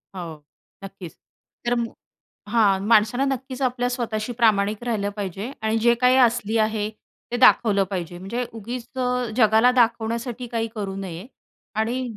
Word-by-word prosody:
हो, 160 -4 -7 0.4
नक्कीच 195 -3 -9 0.5
तर 240 - +3 0.8
हां, 205 -5 +3
माणसानं 230 +5 +3
नक्कीच 265 0 -4
आपल्या 245 -1 0
स्वतःशी 235 -2 -3
प्रामाणिक 215 -2 +2
राहिलं 205 -4 -1
पाहिजे 200 +3 -4
आणि 220 +1 +1
जे 235 +1 +4
काही 250 0 +5
असली 235 -3 +3
आहे 215 -1 0 0.4
ते 245 - -1
दाखवलं 215 -5 +5
पाहिजे. 175 -2 -5
म्हणजे 230 +7 -3
उगीच 230 +2 -6
अ, 250 0 0
जगाला 220 +1 +5
दाखवण्यासाठी 235 0 0
काही 230 -1 -1
करू 200 -3 -4
नये 190 +1 -6 0.5
आणि 235 +4 0
225 Hz, 140 wpm, -23 LUFS, 200-245 Hz, 0.8 s, काही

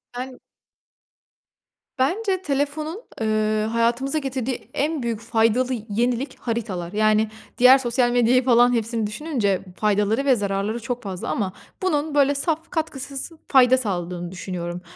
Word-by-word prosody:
Yani 255 +1 -6 1.6
Bence 375 +8 0
telefonun, 300 +4 -2 0.2
eee, 215 0 +1
hayatımıza 235 +5 +1
getirdiği, 265 -3 -2
eee, - - -23
en 300 -1 -1
büyük 230 -2 -2
faydalı 230 +2 +2 0.2
yenilik 240 +5 -1
haritalar. 200 -7 -3
Yani, 215 0 +3 0.3
diğer 255 +2 +8
sosyal 245 -1 +1
medyayı 245 +1 +3
falan 245 -1 +5
hepsini 225 -1 -1
düşününce 215 - -1 0.2
faydaları 210 +4 +1
ve 265 -2 +5
zararları 200 +1 -2
çok 245 +1 -4
fazla 190 -3 -5
ama 195 -5 -1 0.3
bunun 305 -4 0
böyle 285 0 +4
saf 320 +3 -2
katkısız 280 -4 -4 0.2
fayda 260 -1 +6
sağladığını 175 -6 -3
düşünüyorum. 175 -1 -5
240 Hz, 130 wpm, -23 LUFS, 215-275 Hz, 1.6 s, diğer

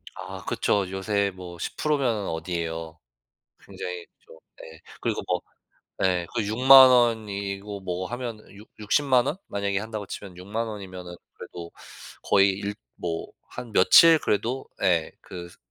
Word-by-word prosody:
아 - - -8
그쵸. 100 -3 0
요새 100 +1 0
뭐 90 -2 -9
10% 150 - -1
면 115 -7 -1
어디예요? 80 -1 -4 0.7
굉장히 90 -1 -6 0.2
좀 80 - -15 0.2
네 80 0 -12 0.2
그리고 - - -1
뭐 - - 0 0.6
예 90 -2 +1
그 115 -3 -1
60,000 130 +5 +8
원이고 105 -4 0
뭐 95 0 -3
하면 120 -1 -5
육 100 +2 -14
육십만 125 +4 +2
원 155 - -2
만약에 100 -1 -2
한다고 110 -1 -5
치면 95 -2 -8
60,000 105 +5 -3
원이면은 95 -4 -8 0.2
그래도 85 -1 -10 0.5
거의 100 0 +4
일 100 +1 -4 0.2
뭐 85 -2 -3 0.2
한 125 -2 -9
며칠 160 - +7
그래도 120 +6 -1 0.2
예 85 -3 +2
그 85 -1 -9
스 - - -19
100 Hz, 235 characters per minute, -25 LUFS, 90-115 Hz, 0.7 s, 60,000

